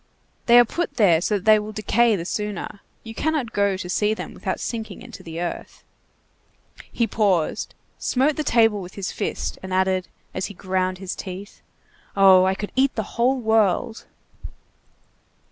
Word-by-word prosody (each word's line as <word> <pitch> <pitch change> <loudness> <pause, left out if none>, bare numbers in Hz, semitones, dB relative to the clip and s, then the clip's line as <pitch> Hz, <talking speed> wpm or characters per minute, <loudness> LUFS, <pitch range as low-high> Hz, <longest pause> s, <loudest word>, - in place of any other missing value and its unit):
They 240 0 +7
are 240 - +8
put 345 +9 -3
there 175 -8 +4
so 210 - 0
that 195 - -10
they 215 -1 +6
will 210 +1 -7
decay 220 +2 +2
the 170 -3 -4
sooner! 210 0 -4 0.2
You 225 - -8
cannot 290 -4 -1
go 200 -1 +1
to 185 - -6
see 210 +4 +1
them - - -7
without - - -4
sinking 230 0 -5
into 245 -1 -11
the 165 0 -7
earth." 175 0 -6 1.1
He 235 - +1
paused, 200 -7 0 0.2
smote 275 +4 +1
the 305 - -2
table 225 -6 +3
with 180 0 -10
his 200 -1 -4
fist, 205 - -4
and 190 - -8
added, 185 0 +1 0.3
as 185 - -2
he 205 - -11
ground 185 0 -1
his 190 0 -5
teeth:— 190 +1 -8 0.6
"Oh! 190 -1 +7
I 190 0 +1
could 205 +1 -6
eat 265 +1 +2
the 220 -2 -4
whole 255 +3 +3
world!" 220 0 +1
205 Hz, 170 wpm, -23 LUFS, 185-230 Hz, 1.1 s, are